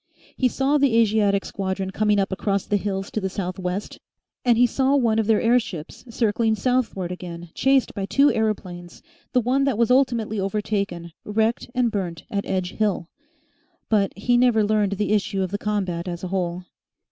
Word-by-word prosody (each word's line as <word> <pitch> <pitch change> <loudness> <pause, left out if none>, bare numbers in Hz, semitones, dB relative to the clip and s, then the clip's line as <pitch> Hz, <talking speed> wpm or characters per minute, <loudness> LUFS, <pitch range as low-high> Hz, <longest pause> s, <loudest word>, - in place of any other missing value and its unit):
He 260 - +2
saw 270 +4 +1
the 270 -5 +3
Asiatic 210 -3 +3
squadron 190 -1 -3
coming 210 +1 +2
up 195 0 0
across 200 0 -1
the 205 - +1
hills 195 0 -3
to 215 - -2
the 190 - -1
south 185 -1 -4
west, 180 +2 -4 0.4
and 240 -2 +4
he 245 - +6
saw 265 +3 +2
one 230 -5 +2
of 220 - 0
their 220 -2 +4
airships 230 -9 -1
circling 225 -1 +1
southward 220 -5 -1
again 175 -1 -7
chased 270 -1 +2
by 195 -2 -4
two 280 +7 +4
aeroplanes, 185 -6 -3 0.3
the 250 - +4
one 255 +4 +1
that 270 -6 0
was 235 +1 +2
ultimately 235 -5 +2
overtaken, 195 -3 -2
wrecked 220 +3 0
and 245 -2 +2
burnt 180 -6 -4
at 200 -1 -2
Edge 185 -1 -1
Hill. 200 -5 -1 0.8
But 200 -3 +1
he 240 +4 +2
never 240 -3 +4
learnt 205 -2 +1
the 210 +1 0
issue 200 -2 0
of 185 - -4
the 205 - -2
combat 190 -5 -2
as 175 0 -5
a 185 - -3
whole. 180 -1 -2
210 Hz, 180 wpm, -23 LUFS, 190-230 Hz, 0.8 s, he